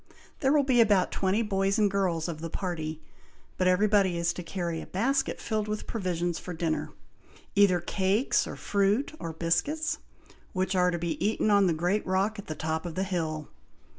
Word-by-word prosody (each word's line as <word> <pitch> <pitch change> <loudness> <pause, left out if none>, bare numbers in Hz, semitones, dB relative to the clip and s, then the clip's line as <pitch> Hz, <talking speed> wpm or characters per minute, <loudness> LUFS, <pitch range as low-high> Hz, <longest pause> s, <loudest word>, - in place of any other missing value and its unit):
There 270 -2 +2
will 295 -1 +4
be 255 -3 +4
about 205 -5 +3
twenty 195 +4 +1
boys 195 -1 +1
and 215 - +4
girls 180 -5 0
of 160 -2 -5
the 165 - -4
party, 160 -4 -4 0.6
but 185 - +3
every 185 +3 +4
body 195 -4 +3
is 170 0 +1
to 180 - -6
carry 170 -2 -3
a - - -9
basket 265 +8 0
filled 215 -2 -2
with 210 0 -3
provisions 175 -5 -2
for 180 - -7
dinner, 160 -1 -1 0.6
either 200 -3 +5
cakes, 195 - +1
or - - -6
fruit, 205 +8 +1
or 165 - -4
biscuits, 225 - 0 0.5
which 190 0 0
are 180 -1 +4
to 175 - -1
be 170 -1 -3
eat 215 - +1
on 200 -2 +4
the - - +3
great 180 +6 0
rock 195 +3 0
at 205 - -9
the 155 - -4
top 160 +2 -2
of 165 - -7
the 190 - 0
hill. 160 -5 -3
185 Hz, 195 wpm, -28 LUFS, 170-210 Hz, 0.6 s, either